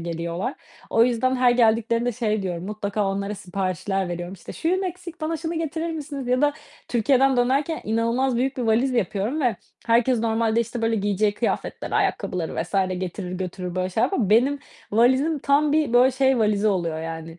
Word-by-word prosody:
geliyorlar. 170 Hz, -, -3 dB, 0.4 s
O 225 Hz, +1 st, +5 dB
yüzden, 255 Hz, +2 st, +1 dB
her 250 Hz, -1 st, +4 dB
geldiklerinde 235 Hz, 0 st, +2 dB
şey 215 Hz, -3 st, -1 dB
diyorum, 175 Hz, -2 st, -4 dB
mutlaka 205 Hz, -1 st, -2 dB
onlara 200 Hz, +1 st, -2 dB
siparişler 190 Hz, 0 st, -2 dB
veriyorum: 175 Hz, +1 st, -5 dB
"İşte 185 Hz, -, -10 dB
şuyum 370 Hz, +4 st, 0 dB
eksik 360 Hz, -2 st, -7 dB
bana 320 Hz, +1 st, -1 dB
şunu 325 Hz, +1 st, -4 dB
getirir 325 Hz, +1 st, -3 dB
misiniz?" 290 Hz, -4 st, -5 dB
ya 255 Hz, +3 st, +2 dB
da 295 Hz, 0 st, +4 dB, 0.4 s
Türkiye'den 260 Hz, +2 st, +3 dB
dönerken 275 Hz, +6 st, +1 dB
inanılmaz 235 Hz, +3 st, +1 dB
büyük 265 Hz, +2 st, 0 dB
bir 250 Hz, -, -2 dB
valiz 235 Hz, +3 st, +2 dB
yapıyorum 220 Hz, -, -1 dB
ve 245 Hz, -4 st, +1 dB, 0.3 s
herkes 235 Hz, +1 st, +3 dB
normalde 225 Hz, 0 st, +1 dB
işte 235 Hz, +1 st, -4 dB
böyle 225 Hz, 0 st, +1 dB
giyeceği 205 Hz, 0 st, +1 dB
kıyafetleri, 230 Hz, -, -3 dB
ayakkabıları 175 Hz, -3 st, -1 dB
vs. 175 Hz, +4 st, -11 dB, 0.2 s
getirir 185 Hz, 0 st, -5 dB
götürür 180 Hz, -1 st, -5 dB
böyle 185 Hz, 0 st, -1 dB
şeyler 220 Hz, -, +2 dB
yapar. 230 Hz, -, -1 dB
Benim 260 Hz, +6 st, +4 dB, 0.3 s
valizim 260 Hz, +8 st, +3 dB
tam 285 Hz, +2 st, +2 dB
bir 305 Hz, -5 st, +1 dB
böyle 250 Hz, +2 st, +6 dB
şey 265 Hz, 0 st, +2 dB
valizi 215 Hz, -1 st, +2 dB
oluyor 170 Hz, -5 st, -1 dB
yani, 165 Hz, 0 st, -7 dB
230 Hz, 175 wpm, -23 LUFS, 195-265 Hz, 0.4 s, böyle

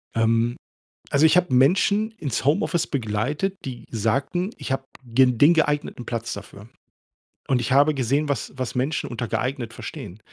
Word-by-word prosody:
Ähm, 115 Hz, +1 st, +2 dB, 0.6 s
also, 140 Hz, +2 st, +3 dB
ich 160 Hz, +3 st, +4 dB
habe 180 Hz, -8 st, +3 dB
Menschen 200 Hz, -, +3 dB
ins 140 Hz, -, -3 dB
Homeoffice 160 Hz, +3 st, +1 dB
begleitet, 140 Hz, -, -2 dB
die 125 Hz, -3 st, -7 dB
sagten: 135 Hz, -, -1 dB
„Ich -, -, -4 dB
habe 135 Hz, 0 st, -2 dB, 0.2 s
g 125 Hz, +2 st, +4 dB
den 145 Hz, +7 st, +5 dB
geeigneten 145 Hz, -5 st, 0 dB
Platz 115 Hz, -1 st, -3 dB
dafür.“ 100 Hz, +1 st, -11 dB, 0.8 s
Und 130 Hz, -3 st, +2 dB
ich 120 Hz, -, -2 dB
habe 145 Hz, +2 st, +5 dB
gesehen, 140 Hz, +4 st, 0 dB
was 140 Hz, -6 st, -2 dB
was 130 Hz, -1 st, -4 dB
Menschen 135 Hz, +5 st, -1 dB
unter 120 Hz, -1 st, -4 dB
geeignet 125 Hz, -2 st, -2 dB
verstehen. 90 Hz, +5 st, -8 dB
135 Hz, 155 wpm, -23 LUFS, 115-150 Hz, 0.8 s, den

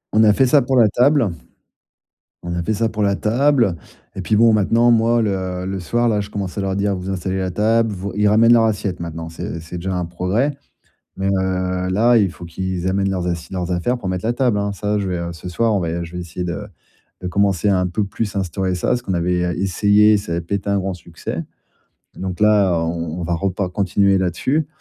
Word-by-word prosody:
On 110 Hz, -, +6 dB
a 105 Hz, -, +6 dB
fait 135 Hz, -, +3 dB
ça 140 Hz, +2 st, +5 dB
pour 130 Hz, +1 st, 0 dB
la 115 Hz, -3 st, +6 dB
table. 125 Hz, +3 st, +3 dB, 1.2 s
On 85 Hz, 0 st, -4 dB
a 85 Hz, -, -2 dB
fait 110 Hz, -, 0 dB
ça 115 Hz, +2 st, 0 dB
pour 110 Hz, -1 st, -2 dB
la 100 Hz, 0 st, +2 dB
table 120 Hz, -2 st, +2 dB, 0.4 s
et 95 Hz, -, -4 dB
puis, 105 Hz, +3 st, 0 dB
bon, 115 Hz, +1 st, +5 dB
maintenant 115 Hz, +3 st, +3 dB
moi, 115 Hz, +1 st, +3 dB
le 95 Hz, -3 st, -2 dB
le 95 Hz, 0 st, -3 dB
soir 120 Hz, +7 st, 0 dB
là, 105 Hz, -, +1 dB
je 100 Hz, -, -7 dB
commence 100 Hz, -3 st, -5 dB
à 100 Hz, -, 0 dB
leur 95 Hz, -1 st, -1 dB
dire: 100 Hz, 0 st, 0 dB
«Vous 90 Hz, +1 st, -6 dB
installez 95 Hz, +1 st, -2 dB
la 95 Hz, -1 st, -1 dB
table, 110 Hz, +3 st, +1 dB
vous» 95 Hz, +1 st, -5 dB
ils 105 Hz, 0 st, +2 dB
ramènent 110 Hz, +3 st, +5 dB
leur 115 Hz, -1 st, +6 dB
assiette 100 Hz, -4 st, -2 dB
maintenant, 80 Hz, -1 st, -6 dB
c'est 85 Hz, 0 st, -6 dB
c'est 85 Hz, +2 st, -8 dB
déjà 95 Hz, +2 st, -3 dB
un 90 Hz, -, -1 dB
progrès. 100 Hz, -, -1 dB, 0.6 s
Mais, 95 Hz, -, -1 dB
heu, 95 Hz, -1 st, 0 dB
là, 115 Hz, +5 st, +4 dB
il 100 Hz, -5 st, +3 dB
faut 90 Hz, -, -11 dB
qu'ils 95 Hz, +1 st, -3 dB
amènent 95 Hz, +1 st, 0 dB
leurs 90 Hz, -2 st, -2 dB
assi 85 Hz, -1 st, -4 dB
leurs 90 Hz, -1 st, -3 dB
affaires, 120 Hz, +9 st, 0 dB
pour 100 Hz, -, -5 dB
mettre 90 Hz, +2 st, -3 dB
la 115 Hz, -, +1 dB
table, 120 Hz, -3 st, +1 dB
hein, 100 Hz, 0 st, -1 dB
ça 105 Hz, +1 st, -1 dB
je 100 Hz, -, -2 dB
vais 90 Hz, -2 st, -2 dB
ce 85 Hz, +2 st, -9 dB
soir 110 Hz, +4 st, +1 dB
on 100 Hz, -, +1 dB
va 85 Hz, 0 st, -2 dB
je 85 Hz, -, -11 dB
vais 90 Hz, -, -5 dB
essayer 90 Hz, +1 st, -5 dB
de 90 Hz, +4 st, -4 dB, 0.5 s
de 90 Hz, -, -5 dB
commencer 100 Hz, 0 st, +1 dB
un 90 Hz, -2 st, +2 dB
peu 100 Hz, +4 st, -1 dB
plus 105 Hz, +1 st, -4 dB
à -, -, +2 dB
instaurer 95 Hz, 0 st, -2 dB
ça, 105 Hz, +7 st, +1 dB
ce 120 Hz, -, -6 dB
qu'on 100 Hz, -5 st, -3 dB
avait 90 Hz, +1 st, 0 dB, 0.2 s
essayé, 105 Hz, +3 st, +4 dB
ça 100 Hz, -4 st, -4 dB
avait 85 Hz, -, -1 dB
pas 85 Hz, +4 st, -4 dB
été 100 Hz, 0 st, -2 dB
un 100 Hz, -, +2 dB
grand 95 Hz, 0 st, -2 dB
succès. 90 Hz, -, -6 dB, 0.7 s
Donc 95 Hz, -1 st, -5 dB
là, 100 Hz, -4 st, +4 dB
on 85 Hz, 0 st, -3 dB
on -, -, -3 dB
va 85 Hz, -, -1 dB
repa 95 Hz, +1 st, -1 dB
continuer 100 Hz, +1 st, +2 dB
là 95 Hz, -1 st, +1 dB
dessus 145 Hz, -, -1 dB
95 Hz, 235 wpm, -20 LUFS, 90-110 Hz, 1.2 s, On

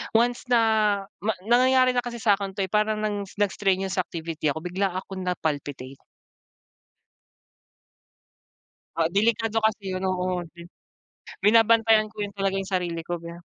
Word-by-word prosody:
once 240 Hz, +2 st, +2 dB
na 240 Hz, -1 st, +5 dB, 0.6 s
ma 220 Hz, +1 st, 0 dB
nangyayari 255 Hz, +2 st, +4 dB
na 245 Hz, -, +1 dB
kasi 240 Hz, -1 st, -5 dB
sa 210 Hz, -3 st, +4 dB
akin 195 Hz, -1 st, -5 dB
'to, 200 Hz, -, -2 dB
eh, -, -, -11 dB
parang 215 Hz, 0 st, +1 dB
ng 205 Hz, -2 st, -2 dB
nag-strenuous 195 Hz, -1 st, 0 dB
activity 160 Hz, -3 st, -4 dB
ako, 160 Hz, +2 st, -3 dB
bigla 190 Hz, +2 st, -1 dB
akong 190 Hz, 0 st, -6 dB
na-palpitate. 145 Hz, -6 st, -3 dB, 3.0 s
Ah, 165 Hz, 0 st, +1 dB
delikado 225 Hz, +3 st, +1 dB
kasi 210 Hz, -3 st, -1 dB
'yun, 185 Hz, 0 st, -3 dB
oo. 180 Hz, -1 st, -1 dB
Bi 170 Hz, -, -13 dB, 0.8 s
binabantayan 225 Hz, 0 st, +5 dB
ko 210 Hz, -1 st, -6 dB
'yun 200 Hz, -, -5 dB
talaga 195 Hz, -1 st, -1 dB
'yung 195 Hz, 0 st, -4 dB
sarili 175 Hz, -3 st, -2 dB
ko 175 Hz, 0 st, -4 dB
ba. 170 Hz, 0 st, -9 dB
195 Hz, 140 wpm, -25 LUFS, 180-220 Hz, 3.0 s, na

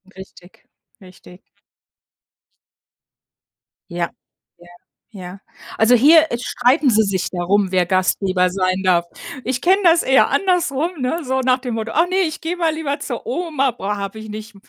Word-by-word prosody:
Richtig, 190 Hz, -1 st, -15 dB, 0.4 s
richtig. 185 Hz, 0 st, -16 dB, 2.5 s
Ja, 170 Hz, -1 st, -2 dB, 0.5 s
ja, 175 Hz, 0 st, -18 dB, 0.4 s
ja. 185 Hz, -2 st, -10 dB, 0.4 s
Also 230 Hz, +3 st, +4 dB
hier, 315 Hz, +6 st, +5 dB
äh, 235 Hz, -, -1 dB
streiten 255 Hz, +4 st, +1 dB
sie 220 Hz, -1 st, +3 dB
sich 190 Hz, -3 st, -2 dB
darum, 190 Hz, +2 st, 0 dB
wer 180 Hz, -1 st, +2 dB
Gastgeber 185 Hz, 0 st, 0 dB
sein 185 Hz, 0 st, -1 dB
darf. 175 Hz, -2 st, +2 dB, 0.4 s
Ich 255 Hz, +1 st, -2 dB
kenne 380 Hz, +3 st, +3 dB
das 335 Hz, -1 st, +4 dB
eher 265 Hz, 0 st, +4 dB
andersrum, 340 Hz, -1 st, 0 dB
ne? 320 Hz, +6 st, -2 dB
So 260 Hz, 0 st, -1 dB
nach 255 Hz, 0 st, +1 dB
dem 245 Hz, -3 st, -5 dB
Motto: 225 Hz, 0 st, -4 dB
Ach 335 Hz, +2 st, +2 dB
ne, 375 Hz, -, -1 dB
ich 325 Hz, -5 st, -1 dB
gehe 345 Hz, +2 st, -4 dB
mal 325 Hz, -2 st, 0 dB
lieber 300 Hz, -2 st, -3 dB
zur -, -, -6 dB
Oma, 320 Hz, -, -1 dB
boah 205 Hz, -2 st, -4 dB
habe 200 Hz, +2 st, -6 dB
ich 220 Hz, 0 st, -10 dB
nicht 215 Hz, 0 st, -9 dB
235 Hz, 155 wpm, -19 LUFS, 190-310 Hz, 2.5 s, hier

